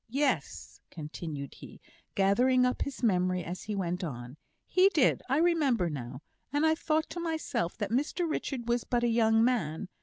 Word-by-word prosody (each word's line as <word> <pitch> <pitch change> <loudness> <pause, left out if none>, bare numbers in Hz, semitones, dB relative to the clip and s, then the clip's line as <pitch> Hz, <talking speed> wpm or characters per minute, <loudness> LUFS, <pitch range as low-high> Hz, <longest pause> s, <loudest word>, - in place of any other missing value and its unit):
Yes," 195 - -2
continued 150 -2 -6
he, - - -12 0.4
gathering 250 +6 +4
up 250 - -1
his 280 -2 -4
memory 185 -4 +2
as 175 +3 -6
he 210 - -4
went 180 -1 -2
on, 125 -5 -6 0.3
"he 370 +1 +4
did 310 -9 +2
I 270 - +2
remember 290 - +2
now 130 0 -7 0.3
and 290 +3 +2
I 315 - +4
thought 315 -1 0
to 350 - -5
myself 320 - -2
that 205 -2 -3
Mr 295 +7 0
Richard 270 -6 -3
was 240 0 +1
but 240 -1 0
a - - +3
young 225 -1 +3
man. 195 -8 0
230 Hz, 175 wpm, -30 LUFS, 170-280 Hz, 0.4 s, gathering